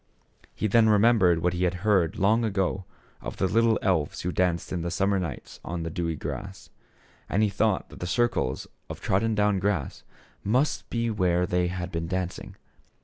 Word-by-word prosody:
Then 110 +2 +4
he - - +4
remembered 105 -6 +4
what 90 0 +2
he 90 +1 -1
had 90 0 0
heard 95 -7 +2
long 110 +5 +3
ago 95 -3 -1 0.4
of - - -6
the - - +1
little 115 +2 +3
elves 85 -7 0
who 90 - -2
danced 90 -1 0
in 90 - -2
the 85 - -2
summer 95 +2 +1
nights 85 -8 -6
on 85 0 -4
the 80 - -4
dewy 85 0 -2
grass; - - -7 0.6
and 105 +3 +2
he 105 - +3
thought 100 - 0
that - - -12
the 90 - -4
circles 115 - 0 0.2
of - - -6
trodden 110 +3 +1
down 105 -2 +2
grass 95 -7 -1 0.4
must 130 +5 0
be 115 -1 -1
where 90 -4 +1
they 90 0 +1
had 90 0 -4
been 85 0 -3
dancing. 90 0 -4
95 Hz, 185 wpm, -26 LUFS, 85-105 Hz, 0.6 s, Then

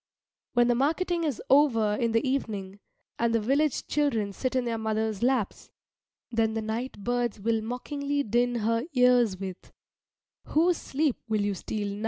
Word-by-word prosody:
When 240 -1 +4
the 245 - +4
marketing 330 +6 0
is 290 -6 -2
over 235 -7 +4
in 230 +2 0
the 230 +4 +1
evening, 205 -7 -3 0.4
and 230 0 +2
the - - +3
village 275 +6 +1
children 230 -9 0
sit 255 +5 -2
in 255 -1 +1
their 230 -1 -2
mothers' 220 -1 -1
laps, 245 -4 0 0.6
then 225 -1 +1
the 225 - -1
night 230 +4 -4
birds 240 -2 -1
will 225 +2 0
mockingly 280 +5 -2
din 245 +1 +1
her 230 +1 0
ears 250 -5 +4
with: 190 -1 -7 0.7
"Whose 335 +2 +2
sleep 285 -1 -1
will 215 -1 +1
you 205 0 0
steal 200 +1 -4
now?" - - -8
235 Hz, 165 wpm, -27 LUFS, 220-270 Hz, 0.7 s, When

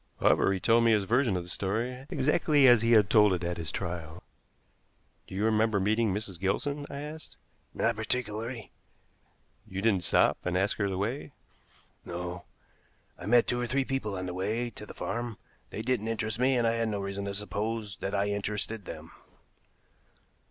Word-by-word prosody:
However, - - +4
he 95 - 0
told 115 +5 +4
me 115 -1 +5
his 105 -2 +3
version 115 -1 +2
of 90 - -3
the 90 - -10
story, 120 +9 -2
exactly 145 0 +3
as 120 -3 +7
he 115 +1 +3
had 105 -3 +6
told 105 -2 +5
it 90 - -5
at 85 0 -2
his 80 -2 -4
trial. 85 -2 -5 1.0
"Do - - -8
you 100 +3 0
remember 110 -1 +2
meeting 110 +2 +2
Mrs. 100 -3 -4
Gilson?" 145 +10 -1
I 140 - -6
asked. 155 +2 -9 0.4
"Not 115 - +1
particularly." 110 0 -3 1.0
"You 95 - -5
didn't 100 -3 +2
stop - - +3
and 90 0 0
ask 95 +2 +1
her 100 -2 0
the 95 - -3
way?" 120 +8 -3 0.7
"No. 90 0 -6 0.7
I - - -7
met 120 +2 +5
two 120 - -1
or 120 - -1
three 135 +2 +1
people 130 -7 -2
on 90 - -4
the 90 - -4
way 110 +6 -2
to 105 0 -10
the - - -10
farm. 120 -2 -4 0.3
They 110 - -5
didn't 120 -3 0
interest 110 0 -2
me, 130 +1 +3
and 120 - +2
I 115 - +3
had 115 -1 0
no 105 -2 -2
reason 100 0 -4
to 100 - -3
suppose 105 +1 -3
that 100 +1 -3
I 100 0 +2
interested 105 +1 -2
them." - - -8
110 Hz, 185 wpm, -29 LUFS, 95-120 Hz, 1.0 s, as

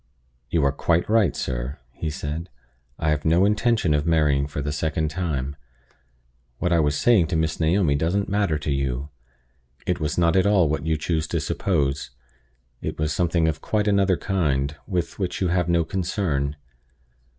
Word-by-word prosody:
"You 80 +1 +2
are 70 - +3
quite 85 +4 +1
right, 110 -7 +3
sir," 60 +2 -3
he 80 +6 -4
said. 75 +4 -5 0.5
"I 75 - 0
have 75 -1 0
no 85 +4 +4
intention 105 -4 +2
of 75 +2 0
marrying 75 -4 +2
for 75 - -5
the 75 +1 -2
second 80 +1 -1
time. 75 -6 -2 1.0
What 90 +6 0
I 85 - +4
was 75 -2 +1
saying 105 -6 +4
to 85 - -2
Miss 80 0 0
Naomi 85 -1 +2
doesn't 85 +8 0
matter 100 -6 +1
to 75 0 -3
you. 70 0 -2 0.8
It 90 0 0
was 75 -2 -2
not 85 -2 +3
at 95 +1 +4
all 95 -5 +4
what 75 +1 -2
you 80 -1 +1
choose 80 0 -1
to - - -1
suppose; 70 -7 -1 0.7
it - - -4
was 75 -1 -1
something 85 -2 +1
of 80 -1 -2
quite 105 -1 0
another 100 -3 +3
kind, 75 -7 0
with 90 -3 -2
which 95 -3 -2
you 90 - +1
have 90 -1 +1
no 85 -1 +3
concern. 80 -6 -1
80 Hz, 175 wpm, -24 LUFS, 75-90 Hz, 1.0 s, no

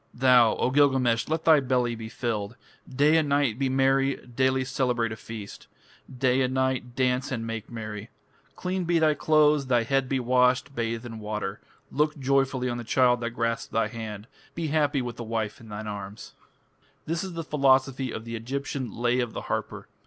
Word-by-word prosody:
Thou, 125 -3 +5
O 125 - 0
Gilgamesh, 130 -4 +3
let 160 +1 -1
thy 160 -2 +7
belly 125 -3 0
be 110 -1 -7
filled! 110 -2 -3 0.3
Day 145 +4 +3
and 155 -2 +1
night 140 -5 +1
be 135 -1 +1
merry, 135 +1 +2
Daily 130 +1 +1
celebrate 125 -4 0
a - - -4
feast, 110 -2 -9 0.5
Day 130 0 +2
and 130 0 0
night 130 -2 -1
dance 130 0 0
and 115 -3 -3
make 115 -1 -5
merry! 110 -2 -7 0.5
Clean 185 0 -2
be 170 0 +1
thy 155 -1 +4
clothes, 150 -2 +3
Thy 120 -2 +3
head 135 +2 0
be 135 - +1
washed, 125 +2 +2
bathe 115 -1 -3
in 115 -2 -7
water! 105 -1 -4 0.3
Look 150 +1 0
joyfully 135 -1 +1
on 120 -1 -3
the - - -5
child 125 +1 +3
that 115 - -1
grasps 115 0 -1
thy 115 - 0
hand, 110 -3 -7 0.3
Be 165 -2 -2
happy 145 -3 +1
with 120 -1 -6
the 120 - -5
wife 110 -2 -3
in 110 - -13
thine 105 +1 -6
arms! 100 0 -7 0.7
This 165 +2 -2
is 190 -2 -6
the 165 0 -4
philosophy 135 -3 +2
of 110 - -6
the 115 0 -5
Egyptian 130 +1 -4
"Lay 120 +3 0
of 120 -2 -2
the - - -4
Harper". - - -4
125 Hz, 190 wpm, -26 LUFS, 115-135 Hz, 0.7 s, thy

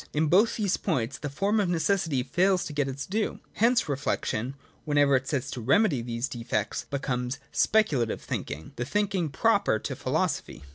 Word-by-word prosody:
In 155 0 +1
both 205 +7 +4
these 205 -4 0
points 130 - -1
the 145 - -4
form 200 +10 +1
of 195 -4 +1
necessity 170 -5 +1
fails 180 +7 +2
to 150 - -6
get 145 -2 0
its 135 +1 -4
due. 215 +3 -2
Hence 235 -1 +3
reflection, 135 -3 -2 0.3
whenever 145 -2 +3
it 130 0 0
sets 140 -4 -1
itself - - -5
to - - -7
remedy 200 - +4
these 115 +2 -3
defects, 115 -4 -3
becomes 130 -2 -2
speculative 145 - +2
thinking, 75 +2 -5
the 120 - -2
thinking 195 0 0
proper 200 - +2
to - - -5
philosophy. - - -2
145 Hz, 175 wpm, -27 LUFS, 130-195 Hz, 0.3 s, both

